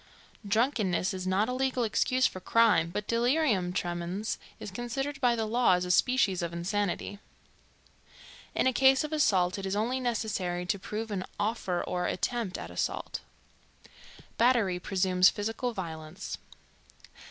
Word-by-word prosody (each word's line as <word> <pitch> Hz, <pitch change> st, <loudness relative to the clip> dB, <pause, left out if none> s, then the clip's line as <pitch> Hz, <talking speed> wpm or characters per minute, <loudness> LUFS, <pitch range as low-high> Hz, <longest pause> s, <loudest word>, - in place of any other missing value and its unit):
Drunkenness 210 Hz, -4 st, +1 dB
is 185 Hz, 0 st, -4 dB
not 195 Hz, +4 st, +2 dB
a 250 Hz, -, -2 dB
legal 260 Hz, -1 st, 0 dB
excuse 255 Hz, +3 st, +2 dB
for 185 Hz, -, 0 dB
crime, 210 Hz, -5 st, +3 dB
but 205 Hz, +4 st, -4 dB
delirium 235 Hz, -, +2 dB
tremens 175 Hz, +3 st, -3 dB, 0.2 s
is 205 Hz, -, -7 dB
considered 270 Hz, +6 st, -4 dB
by 245 Hz, -2 st, +4 dB
the 225 Hz, -1 st, -1 dB
law 235 Hz, -1 st, +3 dB
as 180 Hz, 0 st, +1 dB
a 180 Hz, -, -1 dB
species 205 Hz, -3 st, +3 dB
of 170 Hz, -1 st, -2 dB
insanity. 200 Hz, +3 st, -2 dB, 1.4 s
In -, -, +2 dB
a 260 Hz, -, +3 dB
case 265 Hz, +2 st, +5 dB
of 305 Hz, +1 st, -4 dB
assault 195 Hz, -11 st, +2 dB
it 195 Hz, -, -5 dB
is 190 Hz, -, -1 dB
only 235 Hz, +5 st, 0 dB
necessary 210 Hz, -7 st, -2 dB
to 200 Hz, +2 st, -1 dB
prove 215 Hz, +3 st, -5 dB
an 190 Hz, -2 st, -2 dB, 0.2 s
"offer 205 Hz, -4 st, -1 dB
or 180 Hz, 0 st, -2 dB
attempt 225 Hz, -1 st, -2 dB
at -, -, -7 dB
assault." -, -, -3 dB, 1.2 s
Battery 230 Hz, -7 st, +3 dB
presumes 185 Hz, 0 st, +3 dB
physical 225 Hz, +4 st, -2 dB
violence. 165 Hz, -4 st, -6 dB
210 Hz, 145 wpm, -29 LUFS, 180-240 Hz, 1.4 s, case